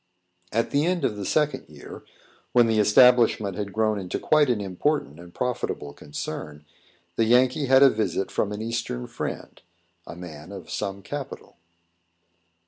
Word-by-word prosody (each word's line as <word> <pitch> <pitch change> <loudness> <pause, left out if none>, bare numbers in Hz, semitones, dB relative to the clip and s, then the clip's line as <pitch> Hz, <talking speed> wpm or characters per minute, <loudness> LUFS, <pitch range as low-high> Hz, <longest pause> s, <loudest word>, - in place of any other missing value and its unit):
At 115 +2 0
the 140 +1 +2
end 180 -1 0
of 105 - -1
the 100 -2 -5
second 150 -1 0
year, - - -11 0.5
when 120 -1 +6
the 110 -1 +1
establishment 110 -2 +5
had 100 0 -4
grown 110 0 0
into 90 -2 -4
quite 150 -3 +3
an 120 -4 +1
important 95 - -2
and 85 0 -12
profitable 120 -11 -3
concern, 75 +1 -7 0.5
the 115 - +3
Yankee 125 +4 +3
had 130 +1 +6
a 135 - +8
visit 105 -3 -2
from 105 - -1
an 105 +1 -4
Eastern 110 - -3
friend, - - -6 0.5
a - - -8
man 85 -1 -10
of 95 -4 -9
some 100 -1 -4
capital. 145 +5 -7
110 Hz, 155 wpm, -25 LUFS, 90-125 Hz, 0.5 s, a